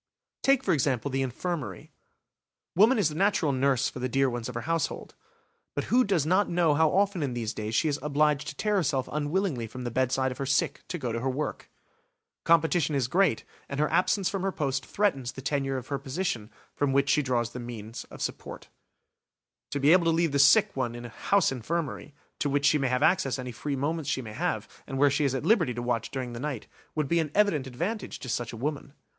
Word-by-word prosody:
Take, 270 -1 +3
for - - +2
example, 140 -2 0
the 135 +1 0
infirmary; 130 - -4 0.8
woman 220 +8 +5
is 195 -7 +3
the - - -7
natural 180 -3 +2
nurse 135 -1 +2
for - - -6
the 130 +1 -2
dear 135 +1 +2
ones 120 0 -4
of 125 - -8
her 120 - -2
household. 165 +5 -2 0.6
But - - -3
who 255 +1 +6
does 190 - +1
not 185 +5 +2
know 170 -3 +3
how 160 +1 +4
often 195 0 +1
in 135 -4 -2
these 115 -1 -2
days 110 +1 -4
she 160 - +3
is 145 -1 0
obliged 150 0 +1
to 150 - -5
tear 210 +4 0
herself 140 -7 0
unwillingly 150 - -1
from 125 +3 -8
the 120 - -3
bedside 130 +2 +1
of 125 - -8
her 135 - -1
sick 135 - 0
to 180 - -4
go 125 -7 -3
to 115 - -2
her 130 +3 -1
work? 145 +4 -4 0.8
Competition 160 -2 +3
is 130 -4 +1
great, 175 - +2 0.3
and 140 - -4
her 150 - +1
absence 190 +1 +2
from 195 - -2
her 195 +1 0
post 135 -5 -2
threatens 140 -12 0
the 135 - -8
tenure 135 -1 -1
of 130 - -7
the 140 -1 -2
position 135 - -3 0.2
from 145 -2 0
which 140 0 +2
she 150 - +4
draws 120 -4 0
the 125 - -7
means 115 -2 -7
of - - -8
support. - - -6 1.0
To 145 - -2
be 140 +3 +5
able 180 -1 +5
to - - +4
leave 165 -1 +2
the 140 - +1
sick 145 0 +6
one 120 -3 -2
in 120 0 -7
a - - -7
"house 195 - +2
infirmary", 145 +3 -4 0.2
to 145 - 0
which 140 +1 +1
she 150 +1 +4
may 135 - +1
have 125 0 +1
access 140 -8 +2
any 125 -1 -5
free 140 +5 -3
moments 150 +2 -2
she 130 - -1
may 110 -2 -8
have, - - -2 0.2
and 135 - -4
where 140 +1 +4
she 145 +1 +1
is 135 -1 +1
at 130 - -3
liberty 170 - +3
to 120 - -3
watch 120 -2 -1
during 130 -3 -4
the 120 - -6
night, 135 -4 -4 0.3
would 155 -2 0
be 170 +4 +2
an 160 -2 -1
evident 195 -10 +2
advantage 175 - -4
to 130 - -8
such 120 0 -2
a 115 - -8
woman. 140 +2 -4
140 Hz, 230 wpm, -28 LUFS, 125-165 Hz, 1.0 s, who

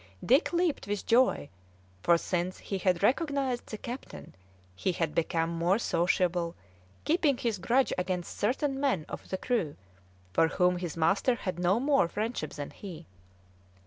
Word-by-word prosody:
Dick 265 +7 +4
leaped 345 - 0
with 205 0 -2
joy, 245 - +3 0.5
for 170 0 +5
since 180 +1 -2
he 195 - -4
had 180 -1 +1
recognised 270 -1 +1
the 215 - -6
captain 245 +4 -8 0.4
he 185 - -1
had 165 -4 -1
become 165 0 0
more 170 +4 +2
sociable, 175 -4 +1 0.5
keeping 305 -4 +2
his 230 -5 -1
grudge 255 +7 +2
against 180 -1 -3
certain 270 +5 0
men 260 - +1
of - - -8
the 190 - -2
crew 185 - -1 0.6
for 165 - +4
whom 180 +1 +2
his 175 -2 -5
master 195 +9 +3
had 185 -6 -4
no 180 +5 +3
more 275 - +3
friendship 210 -4 -3
than 145 -1 -6
he. 175 -5 -9
190 Hz, 150 wpm, -29 LUFS, 170-250 Hz, 0.6 s, for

